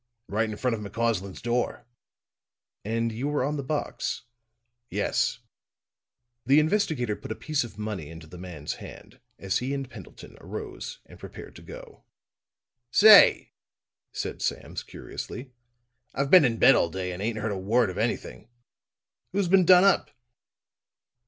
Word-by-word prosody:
"Right 110 +2 0
in 105 - -6
front 125 -2 0
of 110 - -4
McCausland's 105 -2 -2
door." 120 0 -1 1.0
"And 115 +2 -1
you 120 +6 -3
were 145 -3 0
on 145 +3 -1
the 145 - -2
box?" 145 +2 -3 0.7
"Yes." - - 0 1.1
The 135 +4 +5
investigator 155 - 0
put - - -9
a - - -2
piece 155 -3 -1
of 115 -3 -10
money 105 -8 -5
in 80 - -10
the 80 +2 -12
man's 85 -5 -6
hand - - -12 0.2
as 95 -1 -1
he 135 +3 -2
and 135 -1 -4
Pendleton 110 -8 -13
arose - - -7
and - - -16
prepared - - -10
to - - -13
go. - - -12 0.9
"Say," 215 - +7 0.6
said - - -5
Sam - - -3
curiously, 130 +1 -7 0.6
"I've 140 +1 -1
been 180 -6 +8
in 115 -2 0
bed 135 - +7
all 85 - +2
day 90 +2 -4
and 90 +1 -6
ain't 110 +1 -2
heard 110 0 -2
a - - -2
word 110 +2 +2
of - - -6
anything. 65 - -3 0.8
Who's 195 -2 0
been 190 -1 +5
done 180 +1 +7
up?" 195 -1 +3
115 Hz, 150 wpm, -26 LUFS, 100-140 Hz, 1.1 s, been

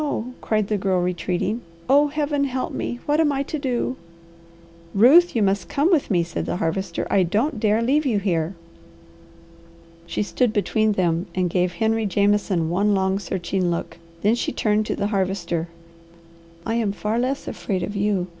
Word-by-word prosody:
cried 215 -2 0
the 210 -1 -1
Girl 190 -1 +1
retreating. 180 +5 -1 0.3
"Oh 285 +2 +5
Heaven 290 -1 0
help 260 -1 -3
me! 240 - -3
What 295 +1 +1
am 310 -2 +3
I 275 0 -1
to 305 +2 -4
do?" 255 -1 -1 1.0
"Ruth, 285 - +6
you 225 - +3
must 195 -3 0
come 300 +6 +2
with 320 -6 +2
me," 175 -5 +2
said 170 - -4
the - - -1
Harvester. 175 +1 -2
"I 195 - +4
don't 220 - 0
dare 215 +1 +2
leave 285 +6 +2
you 225 -5 +1
here." 180 -3 -1 1.5
She 170 - -1
stood 235 +2 0
between 215 0 +1
them 175 -1 0
and 180 -2 0
gave 180 0 +1
Henry 220 +3 0
Jameson 200 -3 +1
one 200 +3 +2
long, 190 0 +1
searching 185 -1 -2
look. 170 0 -4 0.2
Then 210 +2 +4
she 240 - -1
turned 215 0 +1
to - - -1
the - - -2
Harvester. 180 -4 -1 1.0
"I 225 - -1
am 225 -4 0
far 215 +3 -2
less 265 +3 -2
afraid 190 -4 -3
of 205 +4 -4
you. 200 -2 0
205 Hz, 175 wpm, -23 LUFS, 185-240 Hz, 1.5 s, Ruth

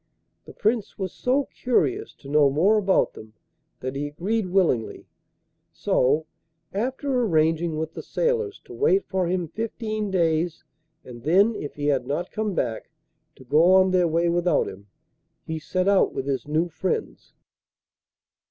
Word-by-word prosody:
The - - -12
Prince 215 0 -1
was 190 -3 -4
so 265 +3 +1
curious 370 - 0
to 135 - -15
know 145 0 +4
more 185 +10 +3
about 195 -2 +2
them 110 0 -12 0.5
that 130 +1 -4
he 145 +1 -2
agreed 190 +8 -2
willingly; 175 - 0 0.7
so, 145 +5 +1 0.5
after 255 +4 -1
arranging 165 -4 +1
with 160 0 -3
the - - -6
sailors 455 -4 -1
to - - -11
wait 400 -2 +2
for 190 -3 -1
him 180 -1 -1
fifteen 215 +1 -4
days, 170 -2 0 0.4
and 120 -2 -10
then, 195 - +3
if 145 - -6
he 145 - -4
had 135 -4 +1
not 160 +5 -3
come 215 -3 -2
back, 115 -7 -2 0.5
to - - -15
go 155 +8 +4
on 190 0 +5
their 180 -2 +3
way 165 +1 +1
without 175 -2 +2
him, 100 +2 -10 0.6
he 160 0 -4
set 185 +4 -1
out 200 -1 +3
with 135 - -3
his 140 0 -2
new 155 +3 +1
friends. 175 +3 -4
175 Hz, 155 wpm, -24 LUFS, 150-215 Hz, 0.7 s, on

